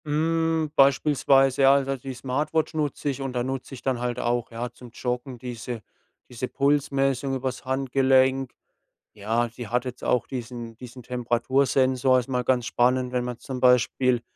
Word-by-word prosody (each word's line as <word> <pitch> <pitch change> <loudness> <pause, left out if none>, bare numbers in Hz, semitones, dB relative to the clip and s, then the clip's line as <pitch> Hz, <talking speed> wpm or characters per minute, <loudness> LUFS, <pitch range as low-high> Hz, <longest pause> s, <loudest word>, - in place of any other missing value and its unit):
Hm, 160 +1 0
beispielsweise, 135 -1 +4
ja, 135 0 +7
also, 135 0 0
die 130 0 -7
Smartwatch 145 +6 -1
nutze 150 -2 -2
ich 135 0 -4
und 135 -1 -3
da 120 -1 -1
nutze 135 +1 -5
ich 125 - -13
dann 130 -3 0
halt 120 0 -2
auch, 120 0 -1
ja, 120 +1 -5
zum 120 0 -13
Joggen 125 +1 -4
diese 120 -1 -6 0.5
diese 125 +1 -5
Pulsmessung 135 -1 +1
über's 130 -1 -4
Handgelenk. 130 0 +2 0.6
Ja, 110 +3 0
die 120 0 -8
hat 125 +4 -1
jetzt 125 -1 -7
auch 125 - +1
diesen 120 -2 -6
diesen 125 0 -11
Temperatursensor. 130 +2 +2
Ist 125 - -6
mal 125 -1 0
ganz 125 -2 +1
spannend, 125 +1 +1
wenn 125 -1 -1
man 125 -1 -5
zum 130 +1 -6
Beispiel 125 0 +3
130 Hz, 165 wpm, -25 LUFS, 125-135 Hz, 0.6 s, ja